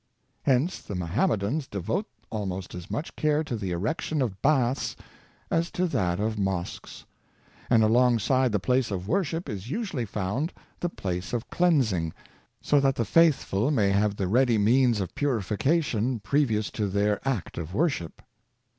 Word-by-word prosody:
Hence 135 +7 +1
the 100 - -6
Mohammedans 105 - 0
devote 100 - -2 0.2
almost 95 -4 -4
as 90 -1 -8
much 150 - -4
care 155 0 +1
to 145 -6 -4
the 100 -4 -3
erection 110 - -2
of 100 -6 -4
baths 135 -3 +1 0.6
as 170 +1 +1
to 180 - +1
that 90 - 0
of 110 0 -1
mosques; 95 -3 -3 0.6
and 115 -2 +5
along 120 +2 +4
side 130 +3 +2
the 105 - +1
place 125 +4 +1
of 95 -2 -4
worship 170 - -1
is 100 +2 -6
usually 165 - -2
found 105 - -2 0.3
the 175 - -1
place 90 - -4
of 120 0 -3
cleansing, 120 - +2 0.5
so 145 - +4
that 135 -1 +2
the 115 - 0
faith 165 - +4
ful 105 +8 0
may 105 -9 +2
have 100 +1 +2
the 95 -2 -1
ready 120 +3 +3
means 115 +1 +3
of 95 - -4
purification 125 - 0
previous 110 -1 +1
to 105 -2 -1
their 100 +1 +1
act 120 -11 -2
of 85 +3 -6
worship. 140 - -1
115 Hz, 160 wpm, -27 LUFS, 100-140 Hz, 0.6 s, and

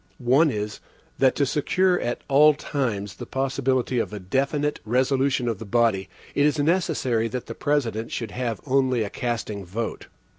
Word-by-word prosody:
One 135 +6 +4
is, 105 -3 -4 0.4
that 130 -1 +4
to 140 - +2
secure 180 +6 +2
at 120 - -3
all 150 +2 +6
times 110 -10 -3
the - - -7
possibility 130 -2 0
of - - -2
a 105 - -5
definite 140 +9 -1
resolution 130 +2 +1
of 115 -4 -1
the - - -6
body, 110 -3 +1 0.2
it 145 - +2
is 150 - 0
necessary 145 -8 +1
that 125 +2 -5
the - - -6
President 120 -7 -1
should 115 -3 -4
have 120 -4 -3
only 130 -3 +2
a 100 - -5
casting 115 -4 -3
vote. 110 +6 -5
125 Hz, 170 wpm, -24 LUFS, 110-140 Hz, 0.4 s, all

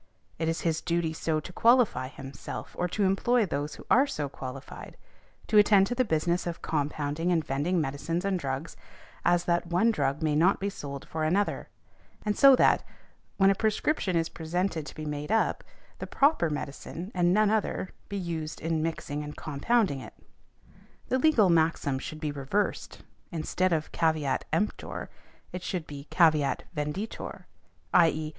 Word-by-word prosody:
It 160 0 0
is 165 - -2
his 165 -1 0
duty 170 -2 0
so 160 -1 -1
to 175 +4 -9
qualify 230 - +4
himself, 135 0 -8
or 180 - +1
to 205 +4 -1
employ 215 +5 +3
those 145 -3 -3
who - - -13
are 265 +4 +6
so 150 - -3
qualified, 135 0 -9 0.5
to 210 - +5
attend 205 -2 +6
to 210 - -2
the 255 +1 +2
business 170 -2 0
of 170 - -5
compounding 150 +2 -1
and 165 -3 +1
vending 150 +7 0
medicines 155 +5 -2
and 195 -2 0
drugs, 135 +1 -4 0.5
as 175 0 +3
that 170 0 +1
one 180 +7 +3
drug 140 -5 -1
may 150 -1 +1
not 175 +6 +4
be 200 +1 -2
sold 140 -6 -7
for 160 -1 -3
another; 190 +6 0 0.6
and 210 -1 +1
so 275 -1 +8
that, - - +4 0.6
when 195 0 +5
a - - +4
prescription 215 - 0
is 165 -1 +2
presented 165 -1 -2
to - - -9
be 155 - -6
made 150 +3 -4
up 225 - +1 0.4
the - - -5
proper 280 - +3
medicine, 150 +5 -6
and 175 -1 +2
none 210 +2 +4
other, 210 -3 -1 0.2
be 200 - -3
used 165 -4 -4
in 165 -1 -1
mixing 155 -2 -3
and 150 0 -8
compounding 155 - 0
it. 130 - -11 0.9
The 260 - +2
legal 245 - +4
maxim 160 -4 +2
should 155 +1 -7
be 150 -1 -2
reversed, 145 +9 -2 0.3
instead 180 +2 0
of 160 -2 -1
caveat 160 -5 0
emptor 210 - -2 0.4
it 180 - -5
should 180 -2 -3
be 145 -1 -9
caveat 155 -5 +3
venditor, 150 +9 -4 0.5
_i.e. 155 -3 +4
165 Hz, 165 wpm, -28 LUFS, 150-195 Hz, 0.9 s, so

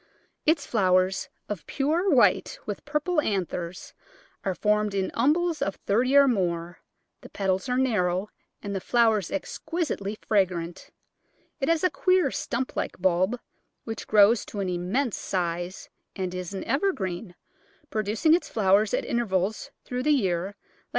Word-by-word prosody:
Its 310 -2 +3
flowers, 185 -3 +2 0.2
of 205 -6 -5
pure 320 +7 +1
white 295 - +3
with - - -5
purple 300 +3 0
anthers, 180 - -3 0.5
are 190 -2 -1
formed 210 0 +1
in 190 -1 -1
umbels 315 +6 +1
of 195 - -1
thirty 250 +7 +1
or 280 0 +7
more; 175 -6 -1 0.4
the - - -12
petals 190 +1 -1
are 250 - +1
narrow 200 -7 +1 0.4
and 200 -1 -4
the 190 - -2
flowers 220 -4 +2
exquisitely 295 - -3
fragrant. 180 -5 -1 0.7
It 270 - 0
has 330 0 +2
a 365 - +3
queer 365 -7 +2
stump 260 -3 -3
like - - -3
bulb 185 +6 +2 0.4
which 225 -1 -6
grows 210 +2 +5
to 205 - -6
an 190 -2 -1
immense 190 +8 -1
size, 175 0 -3 0.3
and 185 -2 -3
is 180 -1 -5
an 195 - -4
evergreen, 195 - -1 0.6
producing 215 +9 +2
its 345 - +1
flowers 200 0 +3
at - - -2
in - - -1
tervals 195 -2 -1 0.2
through 250 0 -3
the 300 - 0
year 185 - +1
like 200 +1 -8
C. - - -54
210 Hz, 150 wpm, -26 LUFS, 185-270 Hz, 0.7 s, or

